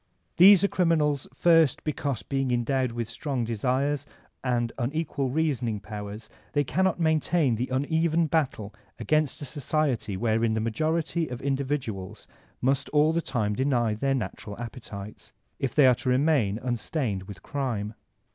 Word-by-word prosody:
These 195 +2 +8
are - - +5
criminals, 155 -7 +1
first, 165 -5 +3
because 145 -5 -2
being 135 -1 -1
endowed 125 +1 0
with 115 -1 -3
strong 125 +2 -3
desires 130 +5 -1 0.4
and 120 -2 0
unequal 140 +1 -1
reasoning 130 -7 0
powers 105 +1 -7 0.3
they 145 - +2
cannot 185 +6 +1
maintain 160 -3 +2
the 120 +3 -1
uneven 160 +5 +1
battle 140 -10 -1 0.2
against 155 -1 0
a - - -3
society 135 -7 -1
wherein 110 +1 +1
the - - 0
majority 155 +8 -1
of 125 -1 -6
individuals 130 -8 -3 0.3
must 135 +2 +1
all 150 +1 +3
the 170 - +1
time 115 -9 -1
deny 120 -2 +1
their 135 +5 0
natural 105 -4 -5
appetites, 110 -4 -8 0.3
if 135 -3 -2
they 145 - +6
are 130 - +7
to 125 +2 -3
remain 130 -6 +2
unstained 120 - -2
with 100 -2 -10
crime. 120 -8 -3
130 Hz, 145 wpm, -27 LUFS, 115-150 Hz, 0.4 s, These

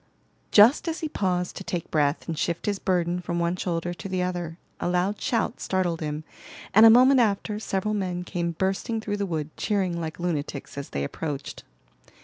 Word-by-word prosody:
Just 225 +11 +6
as 330 0 -2
he 315 - -1
paused 180 -8 -1
to - - -6
take 175 -2 -4
breath 150 -1 +1
and 165 - -2
shift 170 +2 -2
his 205 -2 -1
burden 175 -1 0
from 170 0 -3
one 170 +1 +1
shoulder 175 -1 -2
to 195 +3 -8
the 185 -1 0
other, 175 -2 -3 0.2
a - - -1
loud 180 +3 0
shout 230 0 0
startled 180 -3 0
him, 150 0 -3 0.5
and 220 +3 +9
a - - +10
moment 255 +3 +7
after, 210 -1 +1
several 210 0 -1
men 180 -3 -2
came 170 -1 -2
bursting 195 +6 -1
through 205 -1 -3
the 200 -1 -1
wood, 155 -2 -3
cheering 185 -5 0
like 160 0 -5
lunatics 155 -5 -3
as 140 0 -6
they 70 - -2
approached. 140 - -5
180 Hz, 190 wpm, -26 LUFS, 165-205 Hz, 0.5 s, a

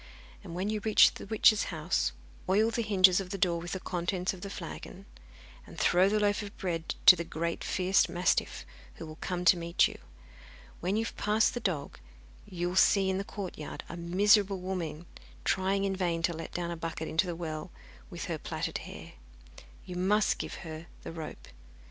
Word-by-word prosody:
When 185 +2 -3
you 215 - -1
reach 215 0 +5
the - - -9
witch's 215 0 +4
house, 160 - -1 0.4
oil 215 +4 +3
the 235 - -1
hinges 190 -4 +5
of 190 -2 -5
the 195 - -4
door 170 -3 +1
with 175 - -5
the 190 - -3
contents 180 +1 -2
of 185 - -11
the 200 - -6
flagon, 195 -1 -8 0.6
and - - -12
throw 185 +2 +4
the 215 +1 +1
loaf 205 0 +1
of 205 0 -9
bread 165 -4 -3
to 180 - +11
the 170 - -3
great 170 0 -3
fierce 185 +1 +2
mastiff, 175 0 0 0.3
who - - -8
will 155 0 -10
come 180 -1 -3
to 175 - +7
meet 170 +1 +2
you. - - -10 0.8
When 185 +3 -1
you 225 +1 0
have - - -6
passed 215 +1 +2
the 240 - -3
dog, 165 -10 -3 0.5
you 175 -1 -2
will 180 - -5
see 195 0 +4
in 190 - -1
the - - -2
courtyard 190 -7 -7
a - - -6
miserable 195 +3 +3
woman 175 -4 -4 0.4
trying 195 +1 +1
in 195 -1 0
vain 170 -3 -1
to 170 - +1
let 165 0 -7
down 175 -1 -3
a - - -3
bucket 160 -1 -4
into 170 +4 +1
the 175 - -3
well 155 -2 -5 0.4
with - - -6
her - - -3
plaited - - -3
hair. - - -10 0.7
You 180 -2 -6
must 205 +3 +2
give - - -5
her 160 +1 -8 0.2
the - - -6
rope. 160 -2 -8
180 Hz, 195 wpm, -30 LUFS, 170-200 Hz, 0.8 s, to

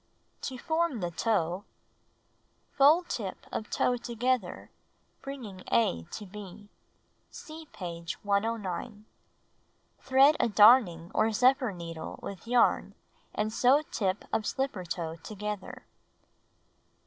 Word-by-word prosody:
To 260 - -5
Form 320 -2 0
the 175 -2 -3
Toe 180 -1 0 1.1
Fold 315 +6 +5
tip 195 -5 -5
of 215 - -4
toe 245 - +1
together, 240 -3 -2 0.5
bringing 240 -9 -8
A 85 -8 +2
to 210 - -8
B. 205 +1 -11 0.6
(See 315 0 -10
page 170 -2 -5
109.) 205 0 -2 0.9
Thread 270 +3 +5
a - - +2
darning 205 -6 +5
or 220 +1 +2
zephyr 255 +2 +3
needle 165 -3 -7
with 200 +2 -8
yarn 245 0 +2 0.4
and 215 +1 -1
sew 265 +6 +4
tip 195 -1 -1
of 215 - 0
slipper 265 -8 -2
toe 165 -1 -4
together. 210 +6 -6
215 Hz, 110 wpm, -29 LUFS, 185-255 Hz, 1.1 s, Fold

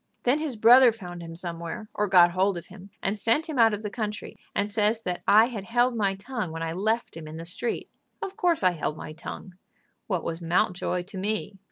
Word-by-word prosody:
Then 255 +5 +3
his 305 -5 -3
brother 240 +3 +7
found 180 -6 -9
him 165 -1 -8
somewhere, 170 +3 -6
or 210 - 0
got 175 -2 +6
hold 190 +1 +1
of 170 - -7
him, 190 +1 -13
and 195 - 0
sent 230 +9 +1
him 300 -5 -3
out 225 -1 +6
of 210 +1 -4
the 210 - -4
country, 210 -2 -4 0.2
and 200 - +1
says 215 +2 0
that 180 -1 -3
I 215 +2 +7
had 225 -5 -6
held 240 +2 +2
my 200 -3 +1
tongue 215 -3 -4
when 165 0 -4
I 165 0 -2
left 220 +5 -1
him 160 -2 -8
in 155 +1 -8
the 165 - -7
street. 190 +7 -3 0.3
Of 390 - -5
course 345 - +1
I 185 - +5
held 155 -2 -3
my 155 - -7
tongue. 180 +3 -9 0.5
What 185 -5 -1
was 165 +1 -4
Mountjoy 175 +1 0
to 190 +2 -9
me? 205 0 -3
200 Hz, 225 wpm, -26 LUFS, 175-225 Hz, 0.5 s, brother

